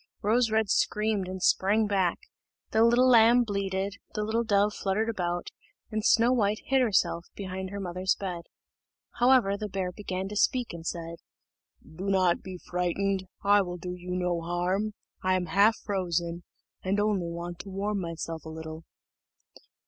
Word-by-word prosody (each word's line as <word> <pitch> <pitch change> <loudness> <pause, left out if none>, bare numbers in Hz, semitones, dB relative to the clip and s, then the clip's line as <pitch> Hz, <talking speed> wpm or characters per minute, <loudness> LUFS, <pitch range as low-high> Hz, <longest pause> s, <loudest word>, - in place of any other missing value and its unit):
Rose 230 +3 +3
red 220 0 +2
screamed 210 -2 +1
and 185 0 -5
sprang 210 +4 +3
back, 190 -4 +1 0.5
the 220 - +4
little 240 +2 +5
lamb 240 0 +6
bleated, 200 -1 -2 0.2
the 210 - -1
little 225 +2 0
dove 205 -1 +2
fluttered 210 +3 -1
about, 175 -5 -2 0.4
and 215 0 -2
Snow 235 +2 +4
white 210 -3 +2
hid 265 0 +3
herself 170 -7 +1
behind 190 -1 -5
her 200 +1 -6
mother's 185 0 -1
bed. 180 -4 -5 0.7
However, 245 -5 +4
the 210 0 -5
bear 190 -2 -2
began 190 -1 -4
to 210 - -6
speak, 245 +1 +1
and 170 -1 -7
said, 170 -1 -4 0.7
"Do 180 +5 -8
not 185 -3 +3
be 185 -1 -7
frightened, 185 +2 -1 0.2
I 205 0 +5
will 180 -2 -4
do 180 +1 -5
you 180 0 -9
no 180 -2 0
harm; 180 +5 -1 0.3
I 185 0 +2
am 185 -1 0
half 205 +5 +4
frozen, 175 -4 -2 0.4
and 195 +2 0
only 205 -4 +1
want 170 +1 -6
to 200 - -8
warm 200 +1 -2
myself 165 -1 -5
a 160 - -8
little." 160 0 -8
195 Hz, 165 wpm, -28 LUFS, 180-210 Hz, 0.7 s, lamb